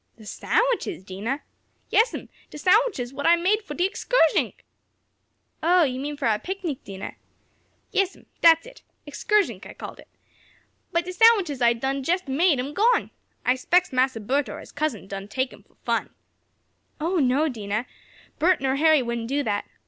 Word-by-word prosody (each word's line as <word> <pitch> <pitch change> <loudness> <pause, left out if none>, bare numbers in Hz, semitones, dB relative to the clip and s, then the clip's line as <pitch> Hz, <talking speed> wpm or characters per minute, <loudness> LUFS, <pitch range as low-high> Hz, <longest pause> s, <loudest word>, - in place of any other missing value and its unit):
"The 220 - -14
sandwiches, 445 - 0
Dinah?" 205 +9 -4 0.5
"Yes'm, 450 +3 +2 0.2
de - - -10
sandwiches 365 - +2
what 285 +1 -2
I 340 - +7
done 340 - -5
make 420 +4 +3
fo' 300 -8 -8
de 355 +4 +2
excursnick!" 395 -4 +1 1.0
"Oh, 350 +2 +4
you 260 -3 -1
mean 290 +2 -4
for 280 - -1
our 215 -2 +2
picnic, 365 -7 -5
Dinah?" 195 0 -7 0.8
"Yes'm, 390 -1 -1 0.2
dat's 330 +1 +6
it. - - -14 0.2
Excursnick 400 - 0
I - - -10
calls - - -9
it. - - -15 0.8
But 340 0 0
de 365 - -5
sandwiches 370 - +4
I 235 0 +5
done 265 +4 -2
jest 350 +5 -1
made 295 +3 +3
am 275 +4 -3
gone. 460 +7 +2 0.3
I 250 - +4
s'pects 350 +6 +1
Massa 255 -2 +1
Bert 265 +6 0
or - - -7
his - - -12
cousin 285 -10 -2
done 195 0 -7
take 260 +4 -2
'em - - -15
fo' - - -32
fun." - - -1 0.9
"Oh, 340 +4 0
no, 280 +1 +2
Dinah. 215 -3 -3 0.5
Bert 350 +4 +3
nor 265 0 0
Harry 310 -2 +4
wouldn't 235 -1 -3
do 285 +2 0
that. 205 -4 -1
290 Hz, 170 wpm, -24 LUFS, 250-360 Hz, 1.0 s, I